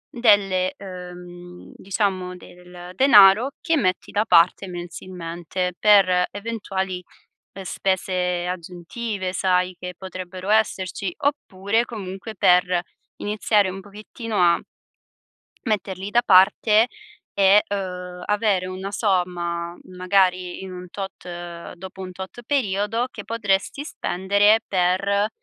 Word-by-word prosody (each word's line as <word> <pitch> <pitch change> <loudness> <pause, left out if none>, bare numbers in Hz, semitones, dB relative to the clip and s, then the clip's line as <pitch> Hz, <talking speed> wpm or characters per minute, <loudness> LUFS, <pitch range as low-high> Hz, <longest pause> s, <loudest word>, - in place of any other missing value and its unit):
delle 200 -6 +3
uhm, 180 -1 -10
diciamo, 185 -2 -2
del 180 0 -12
denaro 220 -1 +7
che 330 -1 +1
metti 185 -8 -1
da 205 +1 +1
parte 175 +2 +4
mensilmente, 175 0 -5
per 185 -4 +5
eventuali, 195 -4 -4 0.5
ehm, 195 - -8
spese 180 -2 -1
aggiuntive, 185 +3 -5
sai, 185 -1 +1
che 180 0 -7
potrebbero 185 +1 -7
esserci; 195 -4 0
oppure, 225 -7 0
comunque, 200 -1 -7
per 180 -1 +3 0.4
iniziare 210 -1 +1
un 190 +1 -7
pochettino 210 +3 -7
a 175 -1 +4 1.0
metterli 195 -3 -2
da 240 +3 +3
parte, 210 +4 +5 0.5
e, 200 +1 +5
uhm, 180 -2 -5
avere 205 -3 +1
una 185 +1 -5
somma, 175 -4 -1 0.2
magari 185 -1 +1
in 190 -1 -7
un 180 0 -9
tot 175 -3 -8
dopo 190 +1 -10
un 185 - -6
tot 190 +6 -9
periodo, 225 -3 0
che - - -7
potresti 225 +4 -1
spendere 200 - +2
per, 195 +3 +1
190 Hz, 110 wpm, -23 LUFS, 180-205 Hz, 1.0 s, denaro